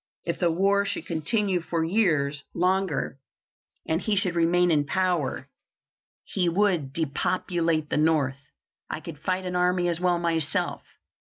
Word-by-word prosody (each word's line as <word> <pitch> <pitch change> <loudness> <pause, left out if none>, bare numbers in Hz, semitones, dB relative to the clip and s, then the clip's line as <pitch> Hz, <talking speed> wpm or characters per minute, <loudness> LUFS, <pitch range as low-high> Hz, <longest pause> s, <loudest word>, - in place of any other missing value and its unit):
If 170 - -2
the 175 - +3
war 195 +4 +2
should 200 - -4
continue 180 +3 0
four 165 0 -1
years 155 -7 +1
longer, 180 -6 0 0.7
and 160 +3 0
he 215 - 0
should 190 -3 +2
remain 175 +1 +3
in 150 -2 +3
power, 175 -2 -1 0.8
he 180 -3 0
would 175 -6 +1
depopulate 165 +1 -1
the - - +1
North. 145 -3 +1 0.4
I - - -3
could 160 -3 -9
fight 185 +4 -2
an 180 0 -3
army 180 0 +2
as 170 -1 0
well 180 -1 +2
myself. 165 -3 0
170 Hz, 145 wpm, -26 LUFS, 155-185 Hz, 0.8 s, the